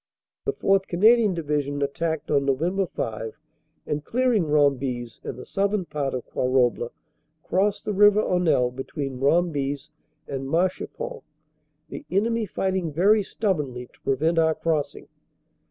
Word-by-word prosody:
"The 420 - 0
4th. 195 - +2
Canadian 215 +2 +4
Division 145 -3 -1
attacked 160 +2 -2
on 140 -2 +3
Nov. 170 +7 0
5, 110 +2 -5 0.5
and, 150 0 -2
clearing 240 -2 +1
Rombies 135 -5 +1
and - - -5
the 125 - -9
southern 200 -1 0
part 140 -5 -2
of 125 - -5
Quarouble, 125 -2 +1 0.5
crossed 205 +2 0
the 210 - -1
River 205 +1 +6
Aunelle 160 -9 +2
between 135 -1 -5
Rombies 145 -1 +1 0.4
and 135 -1 -4
Marchipont, 185 - -2 0.7
the - - -7
enemy 220 +4 +1
fighting 190 -3 -1
very 200 +8 +4
stubbornly 150 - -2
to - - -26
prevent 160 +5 +1
our 160 -1 +3
crossing. 155 -2 -2
160 Hz, 130 wpm, -25 LUFS, 140-195 Hz, 0.7 s, River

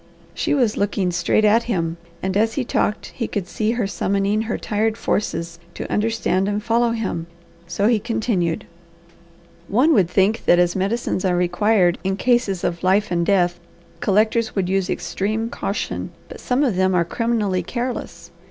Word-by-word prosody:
She - - 0
was 240 -6 +1
looking 200 -2 0
straight 175 +5 +2
at 225 +3 +4
him, 165 -5 -1 0.3
and 190 0 -1
as 220 +2 +2
he 275 - 0
talked 210 - -1
he 230 -4 -2
could 195 -4 -3
see 215 +4 -1
her 240 -3 -1
summoning 200 +2 0
her 220 0 -2
tired 220 +1 -1
forces 170 -6 -2 0.2
to - - -5
understand 210 -3 +1
and 205 0 -2
follow 235 +2 +2
him, 210 -8 -3 0.4
so 200 - -1
he 230 -2 +3
continued: 210 -7 -1 1.0
"One 260 - +3
would 190 - +3
think 195 +4 +1
that 175 - +5
as 175 0 +2
medicines 195 0 -1
are 185 -2 +2
required 180 +1 +2
in 190 0 -1
cases 240 -5 +1
of 170 0 -1
life 195 +2 +2
and 170 -1 +1
death, 175 -2 +2 0.4
collectors 220 +3 +1
would 185 -3 0
use 190 0 0
extreme 220 +4 -2
caution, 200 - -3 0.2
but - - -9
some 255 +3 +1
of 245 -9 +1
them 190 0 +2
are 170 -1 +3
criminally 210 -2 0
careless. 245 +7 -5
205 Hz, 170 wpm, -21 LUFS, 180-225 Hz, 1.0 s, that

